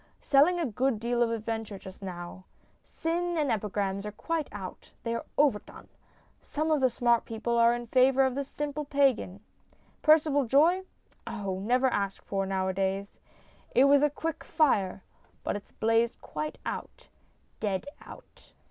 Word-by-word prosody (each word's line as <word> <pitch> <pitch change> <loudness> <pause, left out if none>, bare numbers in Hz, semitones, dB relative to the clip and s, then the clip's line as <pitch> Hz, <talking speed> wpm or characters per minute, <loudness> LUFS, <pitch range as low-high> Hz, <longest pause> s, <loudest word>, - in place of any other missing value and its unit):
Selling 305 +6 +4
a 335 - 0
good 250 -1 0
deal 240 +1 0
of 235 - +3
adventure 225 -2 -3
just 190 +1 -12
now. 180 -1 -7 0.4
Sin 345 +1 -2
and 295 -5 +1
epigrams 200 -2 -1
are 210 - -5
quite 320 +7 -3
out; 195 -3 -8
they 230 - -1
are 230 - -4
overdone. 275 -8 0 0.5
Some 310 +2 -2
of 300 -3 +2
the 260 - +4
smart 235 -1 +2
people 230 +1 -2
are 235 +1 +5
in 240 0 -5
favour 260 +2 +4
of 265 -1 +1
the 280 +2 -2
simple 295 +2 -4
pagan. 270 -9 +1 0.6
Percival 305 -3 +4
Joye? 325 +10 +4 0.4
Oh, 200 -5 -3
never 250 +6 +2
asked 200 -6 -1
for 195 -1 -2
nowadays. 190 +1 -1 0.6
It 255 - +7
was 280 0 +6
a 295 - +4
quick 320 +2 -4
fire, 205 - +1 0.4
but - - -1
it's 205 - -8
blazed 225 +1 +1
quite 305 - -5
out, - - -6 0.5
dead 195 -3 -1 0.2
out. - - -15
235 Hz, 155 wpm, -29 LUFS, 205-285 Hz, 0.6 s, It